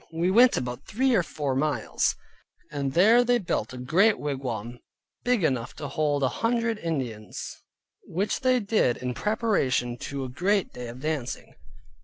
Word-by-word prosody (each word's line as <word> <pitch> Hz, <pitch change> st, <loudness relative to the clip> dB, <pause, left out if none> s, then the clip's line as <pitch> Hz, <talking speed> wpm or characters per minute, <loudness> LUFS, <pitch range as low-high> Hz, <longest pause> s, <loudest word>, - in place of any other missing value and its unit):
We 170 Hz, +3 st, 0 dB
went 240 Hz, +5 st, +6 dB
about 125 Hz, +1 st, -4 dB
three 260 Hz, +4 st, +1 dB
or 200 Hz, -, +4 dB
four 150 Hz, -4 st, -3 dB
miles, 145 Hz, +3 st, 0 dB, 0.6 s
and 140 Hz, -3 st, -2 dB
there 220 Hz, +7 st, +6 dB
they 245 Hz, 0 st, +3 dB
built 175 Hz, -, -2 dB
a 130 Hz, -, -8 dB
great 180 Hz, -, +3 dB
wigwam, 125 Hz, -5 st, -4 dB, 0.4 s
big 245 Hz, -6 st, +2 dB
enough 130 Hz, -6 st, 0 dB
to -, -, -5 dB
hold 145 Hz, -3 st, 0 dB
an 130 Hz, -, +3 dB
hundred 230 Hz, -, 0 dB
Indians, 130 Hz, -, -5 dB, 0.5 s
which 195 Hz, +5 st, -1 dB
they 255 Hz, -1 st, +3 dB
did 205 Hz, -, +1 dB
in 125 Hz, 0 st, -3 dB
preparation 130 Hz, -, 0 dB
to 140 Hz, -1 st, -4 dB
a 130 Hz, -, -5 dB
great 190 Hz, +9 st, 0 dB
day 125 Hz, -1 st, -7 dB
of 120 Hz, +2 st, -9 dB
dancing. 150 Hz, -5 st, -3 dB
155 Hz, 160 wpm, -26 LUFS, 125-210 Hz, 0.6 s, went